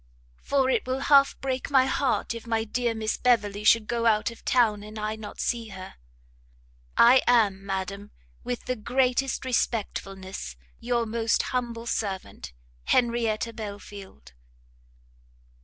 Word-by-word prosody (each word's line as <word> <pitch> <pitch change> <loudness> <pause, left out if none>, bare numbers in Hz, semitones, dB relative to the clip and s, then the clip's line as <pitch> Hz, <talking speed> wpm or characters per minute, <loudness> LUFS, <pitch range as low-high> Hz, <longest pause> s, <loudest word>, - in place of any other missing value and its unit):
for 275 -2 +1
it 260 - 0
will 255 +1 -1
half 275 -1 +4
break 260 -1 -2
my 265 -2 +5
heart, 265 -2 0
if 230 0 -9
my 225 -1 0
dear 235 +1 -1
Miss 220 0 -2
Beverley 210 -4 +1
should 220 0 +5
go 235 +1 0
out 215 +1 +2
of 230 - -14
town, 225 -5 +2
and 215 +1 -10
I 215 0 -2
not 215 -1 -10
see 235 -2 -1
her! 190 -3 -9 1.0
I 250 +3 +7
am, 210 -5 +3
Madam, 200 +1 -4 0.3
with 245 0 -4
the 255 - -1
greatest 255 +3 0
respectfulness, 195 - -3 0.2
your 235 0 0
most 225 0 0
humble 235 -2 -2
servant, 195 - -4 0.3
HENRIETTA 235 -2 +1
BELFIELD. 200 - -9
230 Hz, 135 wpm, -26 LUFS, 210-245 Hz, 1.0 s, I